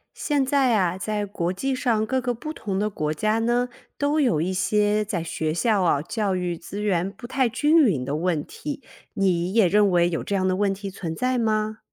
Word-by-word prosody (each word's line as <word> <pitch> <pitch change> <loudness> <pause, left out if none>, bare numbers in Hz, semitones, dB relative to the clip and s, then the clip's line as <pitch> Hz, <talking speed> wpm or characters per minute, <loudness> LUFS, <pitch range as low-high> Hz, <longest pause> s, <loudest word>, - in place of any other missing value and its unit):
现 285 -3 0
在 265 -3 +3
啊， 180 -3 +1
在 210 +2 -2
国 180 -3 -2
际 265 +9 -2
上， 230 -4 +1
各 260 +3 0
个 245 0 -1
不 305 +7 -6
同 200 -9 -4
的 210 - +1
国 155 -7 -2
家 215 +7 0
呢， 240 +2 +1 0.3
都 290 +2 +1
有 240 - +2
一 180 +4 -1
些 210 +3 +2
在 190 -5 -3
学 160 -1 -2
校 210 +3 +2
啊， 155 -5 +2
教 200 +2 -1
育 180 -1 -2
资 200 +5 -7
源 190 -2 0
不 210 +4 -12
太 260 0 +1
均 295 +7 +3
匀 160 - +1
的 140 - -2
问 160 -2 -1
题， 290 -2 -7 0.3
你 185 -3 +1
也 225 -5 +5
认 205 +3 +4
为 175 -2 +3
有 165 -2 -2
这 200 - -2
样 185 -1 +1
的 185 - +1
问 200 +1 +1
题 195 0 -5
存 165 -3 -5
在 255 +5 0
吗？ 215 -1 0
205 Hz, 235 characters per minute, -24 LUFS, 180-240 Hz, 0.3 s, 也